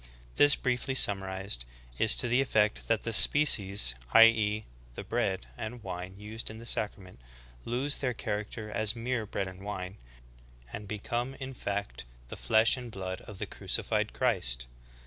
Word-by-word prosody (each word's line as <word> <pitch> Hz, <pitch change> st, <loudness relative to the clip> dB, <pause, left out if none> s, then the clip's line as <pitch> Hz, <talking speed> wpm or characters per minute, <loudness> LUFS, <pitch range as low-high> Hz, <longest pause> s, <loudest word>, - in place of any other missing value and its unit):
This 145 Hz, -1 st, +6 dB
briefly 125 Hz, +1 st, -2 dB
summarized, 95 Hz, -, +2 dB, 0.4 s
is 110 Hz, -, +6 dB
to 125 Hz, -, +2 dB
the 125 Hz, +3 st, +2 dB
effect 105 Hz, -5 st, 0 dB
that 115 Hz, -1 st, 0 dB
the 115 Hz, -, -3 dB
species, 100 Hz, -, +5 dB, 0.2 s
i. 115 Hz, -, +9 dB
e., 110 Hz, -2 st, +2 dB, 0.3 s
the -, -, -6 dB
bread 95 Hz, -1 st, -2 dB
and 110 Hz, +1 st, -7 dB
wine 90 Hz, 0 st, -7 dB
used 110 Hz, +2 st, -6 dB
in 110 Hz, -, -9 dB
the 115 Hz, -, -11 dB
sacrament, 100 Hz, -, -5 dB, 0.5 s
lose 130 Hz, +5 st, 0 dB
their 125 Hz, -3 st, -2 dB
character 105 Hz, 0 st, -5 dB
as 110 Hz, 0 st, +1 dB
mere 115 Hz, -1 st, -3 dB
bread 95 Hz, -1 st, -3 dB
and 95 Hz, 0 st, -10 dB
wine, 95 Hz, -1 st, -6 dB, 0.8 s
and 105 Hz, 0 st, -7 dB
become 120 Hz, +5 st, -4 dB
in 135 Hz, 0 st, -7 dB
fact 100 Hz, -, -5 dB, 0.2 s
the -, -, -7 dB
flesh 110 Hz, +2 st, +4 dB
and 125 Hz, -1 st, -8 dB
blood 95 Hz, -2 st, -6 dB
of 105 Hz, -, -11 dB
the -, -, -4 dB
crucified -, -, -1 dB
Christ. -, -, 0 dB
105 Hz, 160 wpm, -29 LUFS, 95-120 Hz, 0.8 s, i